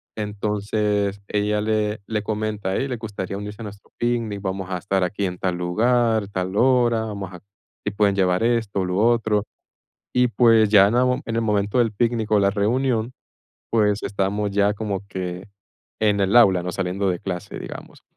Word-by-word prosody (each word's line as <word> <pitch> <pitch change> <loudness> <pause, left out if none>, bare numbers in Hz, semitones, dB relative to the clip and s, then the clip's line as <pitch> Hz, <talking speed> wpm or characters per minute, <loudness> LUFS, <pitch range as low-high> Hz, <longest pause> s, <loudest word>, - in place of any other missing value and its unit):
entonces 105 -1 -1
ella 105 0 0
le 105 0 0
le 105 -2 -2
comenta 105 -2 -3
a - - -1
él: 135 - -1
"¿Les 125 - -3
gustaría 100 -3 -5
unirse 105 +2 -7
a - - -5
nuestro 105 -1 -11
picnic? 115 -4 -1
Vamos 95 -1 -4
a 90 - -2
estar 95 +1 0
aquí 100 +2 -1
en 90 -1 -3
tal 90 -1 -1
lugar, 110 +4 +1
tal 95 -1 -3
hora, 120 -1 +3
vamos 100 -4 -6
a, 90 - -9 0.5
si 105 - -1
pueden 100 -1 +2
llevar 95 +1 +2
esto, 115 -5 0
lo 90 0 -2
otro", 110 -1 +2 0.7
y 125 0 +3
pues, 115 -3 +4
ya 100 -2 +7
aún 125 +4 +2
en 115 0 -2
el 115 - +1
momento 105 +1 0
del 115 -3 +2
picnic 115 0 -1
o 105 - +4
la 100 0 +3
reunión, 115 +3 0 0.6
pues, 105 -2 +2
estábamos 100 +1 -1
ya 100 +1 +2
como 100 -2 -3
que 90 -1 -5 0.6
en 105 -2 +2
el 100 +4 +2
aula, 95 -7 +6
¿no?, 90 0 -4
saliendo 95 +2 -1
de 90 - -3
clase, 90 -3 -5
digamos, - - -9
105 Hz, 180 wpm, -22 LUFS, 100-110 Hz, 0.7 s, ya